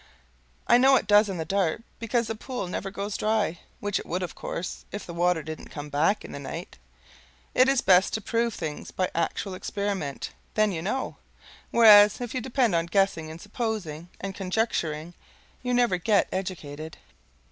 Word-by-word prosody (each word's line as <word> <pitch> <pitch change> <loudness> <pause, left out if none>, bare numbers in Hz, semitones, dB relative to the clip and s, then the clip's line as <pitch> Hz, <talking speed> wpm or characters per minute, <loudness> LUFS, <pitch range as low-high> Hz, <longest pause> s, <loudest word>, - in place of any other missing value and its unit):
I 240 - +6
know 265 +1 +6
it 245 - +2
does 205 +1 +5
in 190 - -3
the 160 - -3
dark, 195 +2 0 0.2
because 235 +1 0
the 225 - -3
pool 235 -2 -5
never 190 +2 -4
goes 200 +1 -4
dry, 215 -6 0 0.2
which 205 -1 -1
it - - -8
would, 180 +2 -2
of 180 - -4
course, 180 - -5
if 205 - -5
the 170 - -7
water 175 -1 +1
didn't 155 -1 -7
come 145 0 -7
back 160 +9 +1
in - - -9
the - - -6
night. 135 - -7 0.7
It 255 +1 +5
is 270 -2 +3
best 185 0 +5
to - - -1
prove 230 +1 0
things 155 -3 -5
by 185 - -1
actual 175 +3 -1
experiment; 190 -6 -3 0.2
then 215 -1 +3
you 165 -3 -3
KNOW; 235 +10 -2 0.5
whereas 210 -3 +8
if 245 -2 -5
you 255 - -1
depend 245 -3 +1
on 165 0 +1
guessing 180 -3 +1
and 160 +1 -8
supposing 205 -7 -4
and 195 0 -4
conjecturing, 180 -5 -1 0.5
you 250 - -2
never 245 -6 +3
get 200 +3 +2
educated. 160 -5 -5
195 Hz, 180 wpm, -26 LUFS, 170-220 Hz, 0.7 s, whereas